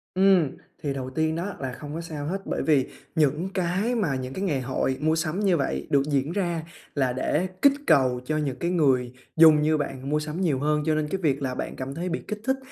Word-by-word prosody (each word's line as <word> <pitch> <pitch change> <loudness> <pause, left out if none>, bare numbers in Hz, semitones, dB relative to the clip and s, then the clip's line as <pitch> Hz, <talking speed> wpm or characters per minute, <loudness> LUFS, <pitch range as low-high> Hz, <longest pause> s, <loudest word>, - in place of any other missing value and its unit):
Ừm, 190 -6 +5 0.3
thì 140 -2 -1
đầu 130 -1 -4
tiên 160 +4 0
đó 185 +4 -3
là 130 -2 -3
không 145 +3 -8
có 165 - -4
sao 155 -3 -6
hết 195 +5 -2
bởi - - -2
vì 145 -4 +3 0.3
những 155 +4 +2
cái 190 +6 0
mà 170 - 0
những 130 0 -4
cái 190 - -5
ngày 145 -9 0
hội 130 +1 -1
mua 155 +1 +2
sắm 165 +3 -1
như 190 -5 +3
vậy 140 - -2
được 140 -1 +4
diễn 145 +1 0
ra 175 -4 -1 0.3
là 130 -3 +1
để 150 +7 0
kích 280 -1 +7
cầu 130 -5 +4
cho 155 +2 -1
những 140 -4 -1
cái 170 +1 0
người 130 -7 +2 0.2
dùng 160 -2 +7
như 155 0 +3
bạn 135 -2 -4
mua 150 +1 +2
sắm 155 +4 -4
nhiều 145 -8 +1
hơn, 150 +1 +1
cho 155 -1 +2
nên 155 -1 0
cái 190 +4 -3
việc 140 -3 +1
là 130 -2 -2
bạn - - -4
cảm 135 +1 -5
thấy 180 +2 -3
bị 175 - -1
kích 210 0 -4
thích 265 +1 +1
155 Hz, 245 wpm, -26 LUFS, 135-175 Hz, 0.3 s, kích